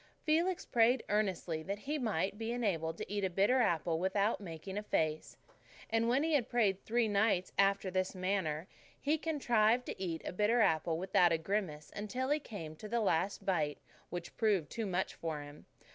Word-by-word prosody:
Felix 335 +4 +1
prayed 240 +1 +3
earnestly 190 -6 0
that 195 +5 -4
he 295 +8 -3
might 200 -5 0
be 225 +1 -2
enabled 170 -9 -1
to - - -5
eat 205 -1 -1
a 190 - +2
bitter 200 +8 +3
apple 165 -5 +1
without 200 +4 +1
making 180 +1 -7
a 210 - -1
face. 155 -6 -1 0.5
And 225 +1 +2
when 265 +4 +3
he 325 0 +1
had 260 -5 +2
prayed 205 -6 +2
three 235 0 +1
nights 200 -3 +2
after 195 -1 +2
this 185 +1 -1
manner, 185 -4 -1 0.3
he 305 +2 +1
contrived 245 -7 +2
to - - -6
eat 170 -4 -3
a - - -4
bitter 210 +5 +2
apple 160 -5 +2
without 180 -1 +3
a 165 - +3
grimace 160 -4 -3
until 250 +6 -2
he 300 - +3
came 165 - -8
to 210 - -8
the 235 +2 +1
last 190 -2 0
bite, 155 -6 0 0.3
which 175 -1 -6
proved 205 -9 +1
too 225 -2 -3
much 185 0 -1
for 160 -3 -4
him. 145 +1 -13
200 Hz, 190 wpm, -34 LUFS, 170-230 Hz, 0.5 s, prayed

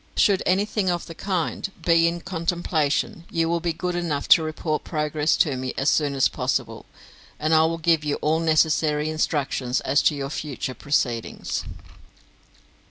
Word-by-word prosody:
Should 195 -2 +4
anything 195 +1 +1
of 175 -1 -1
the 165 - -9
kind 185 +2 -2
be 165 -1 +5
in 170 0 -2
contemplation, 170 -2 -1
you 165 -1 0
will 170 +1 0
be 170 0 -1
good 180 +2 -3
enough 165 -5 -2
to - - +8
report 155 0 -3
progress 150 -1 0
to 145 -5 +2
me 130 0 -4
as 135 - +2
soon 145 -2 +1
as 135 - +4
possible, - - -3 0.5
and 155 +2 +1
I 160 0 +5
will 165 +1 -1
give 165 -1 +2
you 150 -1 0
all 155 +2 0
necessary 155 -1 +2
instructions 135 -5 -1
as 140 +2 +2
to 150 - -5
your 140 0 -4
future 140 -4 -4
proceedings. 125 -5 -2
155 Hz, 165 wpm, -24 LUFS, 145-170 Hz, 0.5 s, to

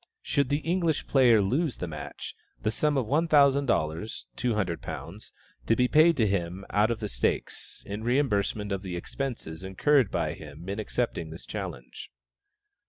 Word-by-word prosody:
Should 140 -3 +1
the 145 +1 -1
English 170 -2 +1
player 120 -6 +5
lose 135 - 0
the - - -3
match, 75 -2 -7 0.3
the 110 - +1
sum 150 +4 +1
of 130 - +1
one 155 +8 +1
thousand 140 -2 +5
dollars 85 0 -1
(£200) 105 -8 -1 0.8
to 115 - +4
be 125 +2 +3
paid 160 +5 +5
to 115 - +3
him 95 -1 -2
out 105 +2 +3
of 115 - -2
the - - -2
stakes, - - -3
in 105 +2 -5
reimbursement 110 -5 +1
of 100 -1 -1
the 95 -3 -5
expenses 95 - -5
incurred 120 +6 +3
by - - -1
him 75 +3 -11
in 100 +2 -3
accepting 110 -6 -2
this 80 +2 -10
challenge. 90 - -7
110 Hz, 165 wpm, -28 LUFS, 95-140 Hz, 0.8 s, player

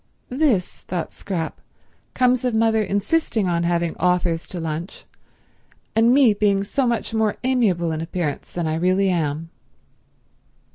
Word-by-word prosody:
"This," 250 - 0
thought 175 -2 -4
Scrap, 170 -5 -5 0.5
"comes 250 -1 +3
of 250 -3 0
mother 220 0 +3
insisting 210 - 0
on 170 -1 +1
having 170 -1 0
authors 180 -2 +1
to 180 - -5
lunch, 165 +2 -5 0.9
and 225 +2 +5
me 260 -4 +5
being 200 -1 +1
so 255 +6 0
much 235 -1 -1
more 220 -2 +1
amiable 210 -10 +1
in 160 0 -3
appearance 165 -2 -4
than 175 -1 -3
I 155 0 -1
really 185 +3 +2
am." 165 -2 -2
190 Hz, 140 wpm, -22 LUFS, 170-225 Hz, 0.9 s, and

